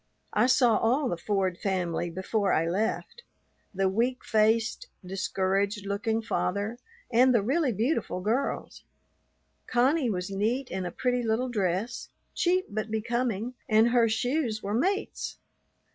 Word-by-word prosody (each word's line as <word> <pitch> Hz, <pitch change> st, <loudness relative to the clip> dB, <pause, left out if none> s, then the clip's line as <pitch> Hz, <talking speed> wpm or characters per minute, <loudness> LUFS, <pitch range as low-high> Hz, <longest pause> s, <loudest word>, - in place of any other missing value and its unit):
I 245 Hz, -, +4 dB
saw 245 Hz, -4 st, +4 dB
all 255 Hz, +5 st, +2 dB
the -, -, -1 dB
Ford 190 Hz, 0 st, -1 dB
family 175 Hz, -3 st, -1 dB
before 190 Hz, +3 st, 0 dB
I 165 Hz, +1 st, +2 dB
left, 215 Hz, -, -2 dB, 0.5 s
the 195 Hz, -1 st, +1 dB
weak 235 Hz, +6 st, 0 dB
faced, 220 Hz, -, +2 dB, 0.2 s
discouraged 195 Hz, +2 st, -1 dB
looking 215 Hz, +3 st, -1 dB
father 210 Hz, +1 st, -2 dB, 0.3 s
and 255 Hz, +2 st, +5 dB
the 215 Hz, -, +3 dB
really 275 Hz, +4 st, +1 dB
beautiful 225 Hz, -, -1 dB
girls. 225 Hz, +9 st, -2 dB, 0.8 s
Connie 255 Hz, +2 st, +2 dB
was 185 Hz, -1 st, -3 dB
neat 230 Hz, +7 st, -1 dB
in 185 Hz, -1 st, -2 dB
a -, -, -5 dB
pretty 250 Hz, -1 st, 0 dB
little 235 Hz, +2 st, 0 dB
dress, 205 Hz, +2 st, -2 dB, 0.2 s
cheap 365 Hz, +1 st, +1 dB
but 215 Hz, +1 st, -4 dB
becoming, 230 Hz, +1 st, -1 dB, 0.2 s
and 220 Hz, +1 st, +5 dB
her 235 Hz, -1 st, +4 dB
shoes 240 Hz, 0 st, -1 dB
were 200 Hz, -, -2 dB
mates. 385 Hz, -, -1 dB
220 Hz, 135 wpm, -28 LUFS, 195-245 Hz, 0.8 s, and